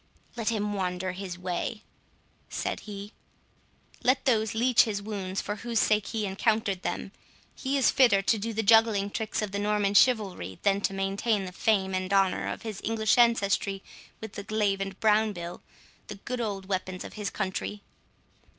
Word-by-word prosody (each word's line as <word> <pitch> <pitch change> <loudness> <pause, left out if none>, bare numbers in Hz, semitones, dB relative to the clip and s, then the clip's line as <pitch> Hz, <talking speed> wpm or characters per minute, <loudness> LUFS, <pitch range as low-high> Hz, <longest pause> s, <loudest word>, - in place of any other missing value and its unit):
"Let 230 -2 -1
him 210 -2 -1
wander 185 -1 -2
his 185 -1 -6
way," 185 +5 -3 0.7
said - - -3
he—"let 210 +5 -5
those 220 -4 +2
leech 245 +1 +5
his 210 -3 -2
wounds 200 -2 -4
for 205 +1 -4
whose 235 +1 -1
sake 215 -1 +2
he 220 -2 -2
encountered 200 0 0
them. 195 - -3 0.4
He 275 +1 -2
is 270 - +4
fitter 235 -7 +4
to 220 - +2
do 225 +3 -3
the 225 0 -1
juggling 220 -2 +4
tricks 220 0 -2
of 205 - -3
the 200 - -2
Norman 205 -1 +1
chivalry 200 - +2
than 200 0 +2
to 195 - 0
maintain 195 +2 0
the 180 - -6
fame 190 0 +1
and 185 0 -2
honour 195 -2 +2
of - - -5
his 220 -3 -6
English 220 +1 +2
ancestry 200 -4 +2 0.4
with 220 -2 -8
the 200 - -5
glaive 205 -2 0
and 195 -1 -5
brown 215 0 +3
bill, 175 -1 -7 0.5
the - - -6
good 240 +5 -5
old 200 -4 -3
weapons 185 -1 -3
of - - -9
his 210 -2 -3
country." 200 +1 -4
205 Hz, 170 wpm, -28 LUFS, 195-220 Hz, 0.7 s, leech